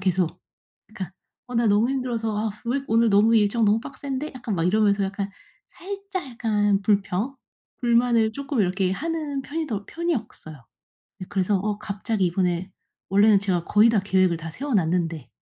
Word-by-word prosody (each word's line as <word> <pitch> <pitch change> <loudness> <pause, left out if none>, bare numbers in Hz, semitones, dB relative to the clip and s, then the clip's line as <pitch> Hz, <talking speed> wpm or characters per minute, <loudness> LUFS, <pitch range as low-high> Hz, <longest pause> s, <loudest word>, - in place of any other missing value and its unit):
계속 185 -3 0 0.5
그러니까 190 -4 -7 0.4
"어 250 - -7
나 235 - +3
너무 210 +5 +3
힘들어서. 235 -5 -2
아 220 +1 -1 0.2
왜 265 +4 0
오늘 230 0 +3
너무 210 +3 +5
일정 215 +2 +3
너무 210 +2 +3
빡센데." 275 +3 -5
약간 230 -5 -3
막 165 - 0
이러면서 205 +1 +3
약간 195 +1 -3 0.4
살짝 390 -2 -6
약간 210 -4 +1
불평 205 +5 0 0.4
불만을 235 -2 +3
쪼끔 275 +2 -4
이렇게 185 0 +1
하는 300 +1 -3
편이 315 +4 -4
더 205 -4 -3
편이었어요. 225 - -4 0.7
그래서 195 0 +1
어 210 +2 -2
갑자기 210 0 -2
이번에 180 +1 -1 0.4
원래는 200 +1 +5
제가 180 -4 0
거의 210 +5 +5
다 220 - +2
계획을 190 -3 +2
다 165 0 -7
세워 275 - -4
놨는데 165 - 0
210 Hz, 340 characters per minute, -24 LUFS, 195-245 Hz, 0.7 s, 너무